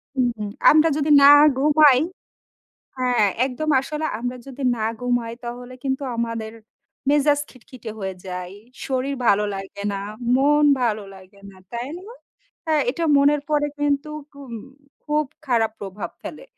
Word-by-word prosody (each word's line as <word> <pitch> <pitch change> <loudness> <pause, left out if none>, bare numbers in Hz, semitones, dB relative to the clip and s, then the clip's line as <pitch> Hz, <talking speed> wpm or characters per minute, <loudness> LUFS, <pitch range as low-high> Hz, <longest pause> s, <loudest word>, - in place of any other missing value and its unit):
হুম, 255 -2 +2
হুম। 210 -1 -4 0.2
আমরা 310 +2 +5
যদি 300 0 -1
না 280 +1 +9 0.3
ঘুমাই 290 -2 +5 1.0
হ্যাঁ, 245 -4 +2 0.2
একদম 290 +4 -4
আসলে 305 +3 -4
আমরা 245 +1 -4
যদি 275 0 -8
না 220 - -2 0.2
ঘুমাই 245 -2 -1
তাহলে 245 +1 -7
কিন্তু 265 +1 -1
আমাদের 230 -1 -3 0.6
মেজাজ 290 0 +3
খিটখিটে 250 -2 -11
হয়ে 190 -1 -4
যায়, 180 0 -6 0.3
শরীর 270 +1 -1
ভালো 205 +1 +4
লাগে 195 +1 -7
না, 195 - -3 0.4
মন 295 +2 +3 0.2
ভালো 215 -3 0
লাগে 190 +1 -17
না, 190 - -18 0.2
তাই 240 +3 -4
না? - - -13 0.6
হ্যাঁ, 310 -2 +2
এটা 330 +5 -3
মনের 285 +1 +4
পরে 295 -1 +2
কিন্তু 290 +1 0 0.2
খুব 280 -2 -12 0.6
খুব 300 0 0 0.2
খারাপ 230 -3 +2
প্রভাব 195 0 -6
ফেলে। - - -8
255 Hz, 145 wpm, -22 LUFS, 220-290 Hz, 1.0 s, না